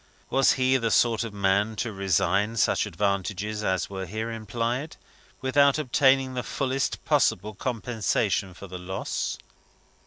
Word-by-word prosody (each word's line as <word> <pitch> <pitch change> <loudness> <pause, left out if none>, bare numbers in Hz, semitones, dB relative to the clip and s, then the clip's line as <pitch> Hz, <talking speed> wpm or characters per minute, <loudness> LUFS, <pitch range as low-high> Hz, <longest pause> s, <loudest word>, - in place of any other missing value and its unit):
Was 135 0 +4
he 130 0 +2
the 115 -3 -1
sort 115 +2 +3
of 115 - -5
man 100 +2 +1
to 110 0 -3
resign 100 +3 +1
such - - +2
advantages 100 +3 -2
as 95 -3 0
were 95 -1 -6
here 110 +5 -4
implied, 115 +6 -3 0.4
without 140 +2 +4
obtaining 135 -2 +3
the 125 - -2
fullest 135 +1 -2
possible 105 +4 +2
compensation 105 -4 -1
for 100 - -10
the 90 -1 -8
loss? 95 +2 -3
110 Hz, 135 wpm, -26 LUFS, 100-130 Hz, 0.4 s, Was